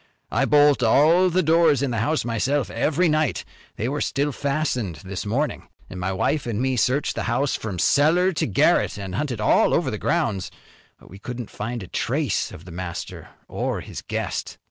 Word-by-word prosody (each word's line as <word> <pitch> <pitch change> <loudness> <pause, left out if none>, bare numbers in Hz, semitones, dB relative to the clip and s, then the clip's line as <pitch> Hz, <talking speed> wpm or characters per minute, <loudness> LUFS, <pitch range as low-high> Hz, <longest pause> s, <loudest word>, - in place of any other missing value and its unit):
I 125 +5 +2
bolt 145 -1 +4
all 160 +10 +4
the 185 +1 +1
doors 160 -4 +4
in 135 - 0
the 115 - -1
house 150 +6 0
myself 130 +4 0
every 165 +4 +1
night. 155 -1 0 0.3
They 110 - -2
were 145 +2 -2
still 145 +2 0
fastened 135 - -2
this 95 +1 -5
morning. 140 +8 -2 0.2
My 90 +1 -3
wife 130 +9 -1
an' 110 -3 -2
me 130 +1 0
searched 130 +5 +1
the - - -3
house 135 +4 +1
from 100 -5 -5
cellar 160 - +3
to 165 - -1
garret 100 - +2
an' 95 -2 -6
hunted 125 +1 -2
all 105 - +3
over - - 0
the - - -4
grounds. 95 -3 -1 0.5
We 95 - -14
couldn't 120 +1 -7
find 120 -2 -5
a - - -9
trace - - -1
of 85 - -11
the 90 - -10
master 85 0 -6 0.2
or - - -3
his - - -8
guest." - - -4
130 Hz, 185 wpm, -23 LUFS, 105-150 Hz, 0.5 s, bolt